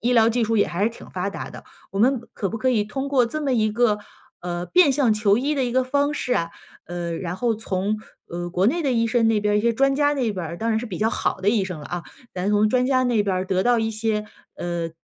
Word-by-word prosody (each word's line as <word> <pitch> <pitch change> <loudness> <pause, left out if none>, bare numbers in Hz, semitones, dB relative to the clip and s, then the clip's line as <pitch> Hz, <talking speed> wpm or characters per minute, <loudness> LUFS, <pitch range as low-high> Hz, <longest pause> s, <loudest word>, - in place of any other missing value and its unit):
医 245 +2 +1
疗 225 -2 +5
技 235 0 +1
术 225 +1 0
也 205 - +4
还 185 +4 -1
是 225 - +2
挺 230 - -13
发 185 +2 -2
达 - - -6
的， - - -11 0.3
我 195 - -3
们 250 +4 +3
可 200 - -2
不 225 - -5
可 260 - +1
以 220 -4 +2
通 270 +6 -4
过 270 -3 +3
这 270 +7 -4
么 275 -4 0
一 215 -2 +2
个， 215 -1 +2 0.4
呃， 175 0 -4
变 355 - +5
相 260 -5 +3
求 210 -1 +3
医 285 +4 0
的 270 -3 +1
一 240 - -2
个 260 +1 +3
方 285 +3 +1
式 255 -3 -1
啊， 170 -5 -1 0.3
呃， 170 -1 -4
然 175 0 -4
后 235 +2 +1
从， 205 -1 -2 0.3
呃， 175 0 -5
国 180 +3 +1
内 335 +9 +1
的 275 -4 +1
医 230 -1 +2
生 230 0 +2
那 220 -2 +2
边 210 0 +1
一 210 - +1
些 235 0 +3
专 275 +4 +2
家 290 +1 +3
那 260 -6 0
边 185 -4 -4
儿， 170 +2 -6
当 225 - -2
然 220 -1 +2
是 235 - -4
比 195 -7 -6
较 220 - +2
好 205 - -1
的 195 - +1
医 210 -2 +2
生 180 -5 -6
了 145 - -8
啊， 175 -1 -4 0.3
咱 185 +2 -1
从 210 +1 +3
专 250 +2 +2
家 260 -1 +3
那 240 -4 +2
边 200 -2 0
儿 185 +1 -2
得 185 0 +1
到 240 +1 +3
一 225 0 0
些， 215 -1 -1 0.3
呃， 170 -1 -3
220 Hz, 305 characters per minute, -23 LUFS, 190-250 Hz, 0.4 s, 疗